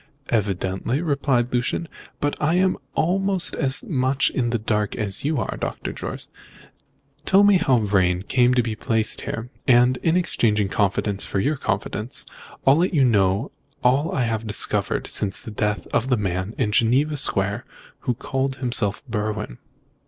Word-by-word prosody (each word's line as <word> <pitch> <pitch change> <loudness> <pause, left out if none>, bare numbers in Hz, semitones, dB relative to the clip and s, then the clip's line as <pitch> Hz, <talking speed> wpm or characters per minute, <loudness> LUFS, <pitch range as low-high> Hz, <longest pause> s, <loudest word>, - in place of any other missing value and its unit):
"Evidently," 100 +3 -1
replied 140 -6 0
Lucian; 125 +7 -1 0.3
"but 145 0 -1
I 155 +3 +2
am 185 0 +3 0.2
almost 190 +2 +1
as 135 -3 0
much 130 -2 +1
in 120 -3 0
the 120 - 0
dark 105 -1 -1
as 100 -3 -3
you 150 -1 0
are, 100 - -3
Dr. - - -4
Jorce. - - -6 1.0
Tell 195 +1 +5
me 205 -1 +6
how 135 -7 +3
Vrain 95 -4 +1
came 125 +3 +3
to 125 - +3
be 110 -2 -3
placed 110 0 0
here, 115 +2 -5 0.2
and, 125 0 +4
exchanging 115 - +1
confidence 100 0 0
for 100 - -2 0.2
confidence, 110 -1 -3 0.4
I'll 135 +2 +6
let 175 +1 +1
you 140 -3 +5
know 100 +1 +2 0.3
all 135 +6 +2
I 130 - 0
have 115 -1 -2
discovered 105 - 0
since 100 -2 0
the 110 - -8
death 105 0 -1
of 125 +3 +1
the 125 - +3
man 95 +1 -2
in 110 -5 0
Geneva 130 +8 +2
Square 100 -4 +2 0.4
who 125 - -2
called 135 +2 -2
himself 120 -6 0
Berwin." 105 - -3
120 Hz, 155 wpm, -23 LUFS, 105-140 Hz, 1.0 s, me